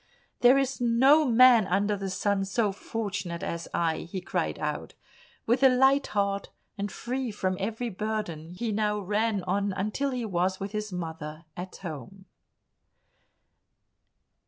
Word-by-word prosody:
"There 250 Hz, +2 st, +6 dB
is 270 Hz, -2 st, -1 dB
no 265 Hz, +6 st, +5 dB
man 240 Hz, -3 st, +6 dB
under 200 Hz, +3 st, +1 dB
the 195 Hz, -1 st, -4 dB
sun 200 Hz, +1 st, 0 dB
so 205 Hz, +1 st, +1 dB
fortunate 195 Hz, -4 st, -4 dB
as 170 Hz, 0 st, -4 dB
I," 165 Hz, -2 st, 0 dB
he 185 Hz, +2 st, -5 dB
cried 180 Hz, -, -2 dB
out. -, -, -4 dB, 0.5 s
With 240 Hz, +3 st, +2 dB
a 265 Hz, -, +8 dB
light 265 Hz, +2 st, +4 dB
heart 200 Hz, -1 st, -1 dB, 0.3 s
and 200 Hz, -1 st, -4 dB
free 255 Hz, +1 st, -3 dB
from 190 Hz, -3 st, -1 dB
every 225 Hz, +4 st, -3 dB
burden 185 Hz, -6 st, -4 dB
he 225 Hz, +4 st, -2 dB
now 210 Hz, 0 st, 0 dB
ran 205 Hz, 0 st, 0 dB
on 200 Hz, +2 st, 0 dB
until 215 Hz, +9 st, -1 dB
he 250 Hz, -3 st, -3 dB
was 185 Hz, -1 st, 0 dB
with 195 Hz, 0 st, -4 dB
his 210 Hz, -1 st, -4 dB
mother 160 Hz, -2 st, -6 dB
at 180 Hz, +1 st, -7 dB
home. 175 Hz, +3 st, -8 dB
205 Hz, 145 wpm, -28 LUFS, 185-230 Hz, 0.5 s, a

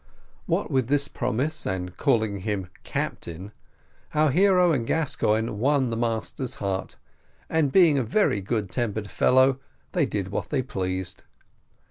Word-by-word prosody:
What -, -, 0 dB
with 130 Hz, -3 st, +1 dB
this 140 Hz, +1 st, +2 dB
promise 155 Hz, +7 st, -1 dB
and 90 Hz, -1 st, -3 dB
calling 110 Hz, -1 st, +1 dB
him 95 Hz, -2 st, -3 dB
captain, 90 Hz, +5 st, -4 dB, 0.6 s
our 150 Hz, -1 st, +4 dB
hero 180 Hz, +2 st, +4 dB
and 120 Hz, -7 st, 0 dB
Gascoigne 115 Hz, -8 st, +1 dB
won 130 Hz, +3 st, +1 dB
the -, -, -1 dB
master's 115 Hz, +2 st, -2 dB
heart, 95 Hz, -1 st, -3 dB, 0.6 s
and 160 Hz, -4 st, +2 dB
being 165 Hz, -6 st, +5 dB
a -, -, +1 dB
very 115 Hz, -, +1 dB
good 105 Hz, -1 st, -2 dB
tempered 110 Hz, -4 st, -2 dB
fellow, 130 Hz, +1 st, +4 dB, 0.3 s
they -, -, +1 dB
did 100 Hz, -2 st, -3 dB
what 100 Hz, -, -3 dB
they 135 Hz, -3 st, 0 dB
pleased. 95 Hz, -5 st, -3 dB
115 Hz, 140 wpm, -25 LUFS, 100-140 Hz, 0.6 s, being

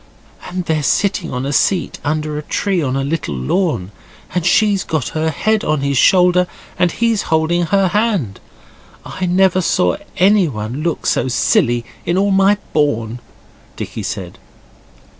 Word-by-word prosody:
'And 180 Hz, -1 st, -4 dB
they're 160 Hz, -2 st, 0 dB
sitting 190 Hz, +3 st, 0 dB
on 125 Hz, +1 st, -3 dB
a 140 Hz, -, -2 dB
seat 185 Hz, +5 st, +1 dB
under 150 Hz, 0 st, -2 dB
a 150 Hz, -, -3 dB
tree 185 Hz, +4 st, -1 dB
on 130 Hz, -3 st, -1 dB
a 135 Hz, -, -1 dB
little 145 Hz, -, -3 dB
lawn, 100 Hz, -, -1 dB, 0.4 s
and 180 Hz, -, 0 dB
she's 200 Hz, +2 st, +3 dB
got 155 Hz, -5 st, -2 dB
her 160 Hz, 0 st, -1 dB
head 215 Hz, +7 st, 0 dB
on 155 Hz, -2 st, 0 dB
his 140 Hz, 0 st, 0 dB
shoulder, 180 Hz, +4 st, +4 dB, 0.3 s
and 180 Hz, -1 st, +3 dB
he's 230 Hz, -3 st, +1 dB
holding 165 Hz, +2 st, +1 dB
her 195 Hz, 0 st, +2 dB
hand. 200 Hz, -, 0 dB, 0.7 s
I 185 Hz, -, -4 dB
never 185 Hz, +1 st, +3 dB
saw 90 Hz, -, +1 dB, 0.2 s
anyone 150 Hz, -, +1 dB
look 165 Hz, 0 st, -2 dB
so -, -, +1 dB
silly 120 Hz, -1 st, +1 dB, 0.2 s
in 170 Hz, +2 st, 0 dB
all 200 Hz, +1 st, +2 dB
my 195 Hz, +1 st, +4 dB, 0.2 s
born,' 120 Hz, -6 st, 0 dB, 0.6 s
Dicky -, -, -6 dB
said. -, -, -6 dB
165 Hz, 155 wpm, -17 LUFS, 140-190 Hz, 0.7 s, shoulder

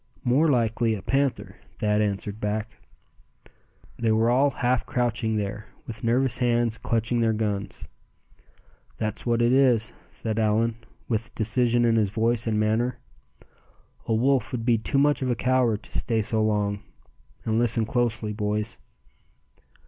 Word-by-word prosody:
"More 135 Hz, +6 st, +3 dB
likely 115 Hz, -4 st, +1 dB
a 100 Hz, -, -8 dB
panther," 135 Hz, +2 st, -1 dB, 0.2 s
Thad 105 Hz, 0 st, +1 dB
answered 100 Hz, 0 st, -2 dB
back. 105 Hz, +1 st, -2 dB, 1.3 s
They 115 Hz, -2 st, +1 dB
were 110 Hz, +2 st, +3 dB
all 135 Hz, +3 st, +4 dB
half 125 Hz, -2 st, 0 dB
crouching 120 Hz, -2 st, -1 dB
there, 105 Hz, +1 st, -3 dB, 0.2 s
with 110 Hz, -2 st, -8 dB
nervous 125 Hz, +1 st, +2 dB
hands 120 Hz, -2 st, +1 dB
clutching 115 Hz, +1 st, 0 dB
their 115 Hz, -1 st, +2 dB
guns. 105 Hz, -2 st, -3 dB, 1.1 s
"That's 110 Hz, +2 st, -4 dB
what 120 Hz, 0 st, +2 dB
it 120 Hz, +1 st, +3 dB
is," 125 Hz, -5 st, +3 dB, 0.2 s
said 110 Hz, +1 st, -4 dB
Allan, 110 Hz, +1 st, +1 dB, 0.3 s
with 115 Hz, 0 st, -3 dB
decision 120 Hz, +2 st, +2 dB
in 115 Hz, -1 st, +3 dB
his 105 Hz, -3 st, +2 dB
voice 115 Hz, +2 st, 0 dB
and 110 Hz, -1 st, +1 dB
manner. 115 Hz, +3 st, 0 dB, 1.1 s
"A 115 Hz, -, +1 dB
wolf 125 Hz, 0 st, +1 dB
would 115 Hz, -3 st, -3 dB
be 120 Hz, -2 st, +3 dB
too 125 Hz, -, -1 dB
much 145 Hz, +1 st, +3 dB
of 130 Hz, -, -1 dB
a 120 Hz, -, +1 dB
coward 125 Hz, -3 st, +1 dB
to -, -, -10 dB
stay 110 Hz, -2 st, 0 dB
so 110 Hz, +1 st, 0 dB
long. 105 Hz, -1 st, 0 dB, 0.6 s
And 110 Hz, 0 st, +1 dB
listen 115 Hz, -1 st, +2 dB
closely, 110 Hz, -2 st, -1 dB
boys." 105 Hz, 0 st, -2 dB
115 Hz, 150 wpm, -25 LUFS, 110-120 Hz, 1.3 s, all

